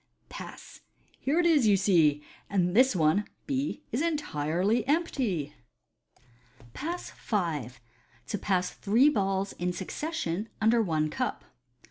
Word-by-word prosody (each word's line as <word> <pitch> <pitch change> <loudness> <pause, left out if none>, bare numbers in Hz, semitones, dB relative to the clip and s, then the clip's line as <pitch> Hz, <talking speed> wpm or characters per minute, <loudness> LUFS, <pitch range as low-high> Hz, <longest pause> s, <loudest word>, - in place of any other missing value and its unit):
Pass! - - -10 0.4
Here 290 +6 +1
it 350 - +3
is, 300 -9 +4
you 200 -2 +5
see, 160 -7 +3 0.3
and 180 -2 +1
this 255 -1 +5
one 165 +5 +3 0.2
(B) 280 +1 -2
is 245 - 0
entirely 210 - 0
empty." 265 - 0 1.2
Pass 340 +4 -5
V. 165 - -2 0.6
To 205 - -3
pass 185 -2 0
three 235 +8 +3
Balls 195 -6 0
in 180 +1 0
succession 205 - -3
under 225 +2 +4
one 155 -6 0
Cup. - - -3
205 Hz, 120 wpm, -28 LUFS, 175-270 Hz, 1.2 s, you